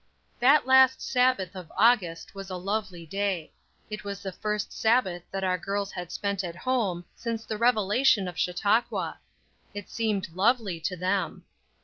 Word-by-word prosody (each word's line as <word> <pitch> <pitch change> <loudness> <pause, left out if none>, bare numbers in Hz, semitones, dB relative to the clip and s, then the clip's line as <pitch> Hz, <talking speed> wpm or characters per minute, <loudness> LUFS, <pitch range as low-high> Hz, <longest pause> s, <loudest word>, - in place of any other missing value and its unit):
THAT 275 +4 +5
last 260 0 +6
Sabbath 250 -8 +1
of 180 -3 -9
August 200 -8 +2
was 195 -1 -8
a 185 - -4
lovely 190 -2 -3
day; 195 -2 -2 0.4
it 215 -1 -6
was 200 -1 -6
the 190 - -4
first 210 +2 -3
Sabbath 220 -6 +2
that 195 0 -4
our 185 -1 +1
girls 200 +2 -2
had 180 -2 -6
spent 200 -1 -2
at 170 -2 -5
home 190 -5 -1
since 230 -1 -4
the 220 - -3
revelation 220 -2 +3
of 180 - -6
Chautauqua. 205 +7 0 0.6
It 205 -1 -7
seemed 215 -5 -1
lovely 205 -3 +2
to 185 +3 -2
them. 185 +2 -1
200 Hz, 155 wpm, -27 LUFS, 185-225 Hz, 0.6 s, last